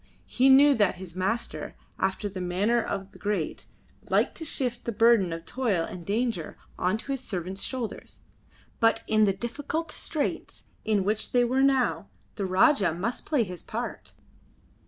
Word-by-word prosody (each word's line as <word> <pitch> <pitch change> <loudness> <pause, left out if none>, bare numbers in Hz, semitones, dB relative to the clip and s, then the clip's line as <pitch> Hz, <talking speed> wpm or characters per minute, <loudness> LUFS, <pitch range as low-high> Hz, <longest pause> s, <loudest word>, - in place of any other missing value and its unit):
He 260 +2 +3
knew 280 +2 +8
that 205 -7 +2
his 180 -2 -10
master, 195 +6 -2 0.2
after 190 +2 0
the 190 -2 -6
manner 200 +7 +1
of 195 -2 -4
the - - -16
great, 200 -6 -2 0.4
liked - - +2
to 320 - -5
shift 245 -5 -2
the 235 - -1
burden 225 -5 +4
of 165 0 -6
toil 225 -10 0
and 180 - -8
danger 210 -3 -2 0.2
on 185 +4 0
to 275 - -6
his 270 -2 -2
servants' 190 -4 -4
shoulders, 250 -4 -5 0.6
but 225 0 +3
in 215 0 +4
the 200 - +3
difficult 290 - -4
straits 305 -1 -3 0.2
in 210 -3 +1
which 210 +2 -1
they 245 -1 +5
were 260 +3 +1
now 270 -2 +2 0.2
the 200 -3 -3
Rajah 190 - +4
must 215 +8 -3
play 295 -6 +2
his 180 -4 -7
part. - - -6
215 Hz, 165 wpm, -27 LUFS, 190-250 Hz, 0.6 s, knew